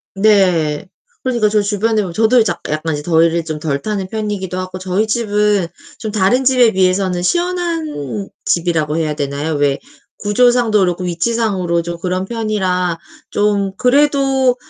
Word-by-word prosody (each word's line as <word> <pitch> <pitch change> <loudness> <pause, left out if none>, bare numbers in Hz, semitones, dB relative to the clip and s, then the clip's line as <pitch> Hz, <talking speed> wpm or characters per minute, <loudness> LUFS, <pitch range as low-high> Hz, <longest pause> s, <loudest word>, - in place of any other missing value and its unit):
네. 185 -6 +2 0.4
그러니까 235 -5 +1
저 210 0 +2
주변에 210 +2 0
보면 180 -4 -5
저도 225 +6 +4
이제 215 -5 +2
약 170 - -7
약간 155 +1 -2
이제 145 - -6
더위를 165 0 +2
좀 155 -2 -4
덜 140 -3 -2
타는 205 -3 -3
편이기도 205 -4 -3
하고 185 0 -5
저희 185 +3 0
집은 210 -4 +1 0.3
좀 220 - -4
다른 215 +6 +2
집에 250 -3 +4
비해서는 185 -1 +1
시원한 330 - -2 0.2
집이라고 165 -3 0
해야 155 -2 0
되나요? 145 +2 -3
왜 145 -1 +1 0.4
구조상도 230 +1 +3
그렇고 180 -1 0
위치상으로 180 -2 0
좀 170 0 -5
그런 185 +1 -2
편이라 190 -6 -1 0.3
좀 205 -1 +1
그래도 270 -1 +3
195 Hz, 330 characters per minute, -17 LUFS, 170-220 Hz, 0.4 s, 저도